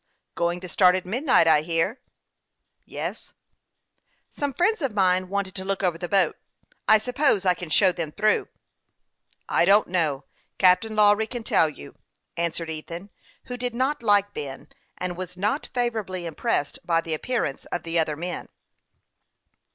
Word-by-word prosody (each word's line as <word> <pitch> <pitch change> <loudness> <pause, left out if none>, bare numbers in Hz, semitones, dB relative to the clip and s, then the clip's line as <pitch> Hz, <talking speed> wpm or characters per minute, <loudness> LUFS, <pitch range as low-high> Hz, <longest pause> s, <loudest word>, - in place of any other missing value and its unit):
" - - -55
Going 170 +1 -1
to 185 - -7
start 180 0 +4
at 185 - -3
midnight, 245 - +3
I 155 -2 +5
hear." 165 - -1 0.5
" - - -55 0.3
Yes." - - -6 0.5
" - - -51 0.3
Some 285 -1 -2
friends 360 +7 +1
of 265 -7 -2
mine 185 -2 +2
wanted 200 -1 -2
to 190 - -5
look 195 0 -2
over 175 -3 0
the 175 - -5
boat; 195 -1 +2 0.5
I 220 - +7
suppose 250 -2 +1
I 180 - +5
can 175 -1 -8
show 185 +4 +5
them 170 -4 -4
through." 215 +5 +1 0.5
" - - -43
I - - +2
don't 200 +4 +5
know; 155 -6 0 0.3
Captain 190 +4 +4
Lawry 210 +1 +4
can 240 0 -6
tell 160 -6 +3
you," 105 - -12 0.4
answered 170 -1 -2
Ethan, 170 +5 -7 0.3
who 250 -1 -6
did 245 -1 -3
not 265 +3 0
like 205 -2 +3
Ben, 135 -2 -7 0.3
and 180 -1 -3
was 180 0 -7
not 210 +10 -1
favorably 220 -8 -2
impressed 150 -3 -1
by 165 -1 +1
the 165 -1 -5
appearance 155 - -2
of 175 - -4
the 165 0 -1
other 155 -2 0
men. 175 +3 -5
185 Hz, 170 wpm, -25 LUFS, 170-215 Hz, 0.5 s, I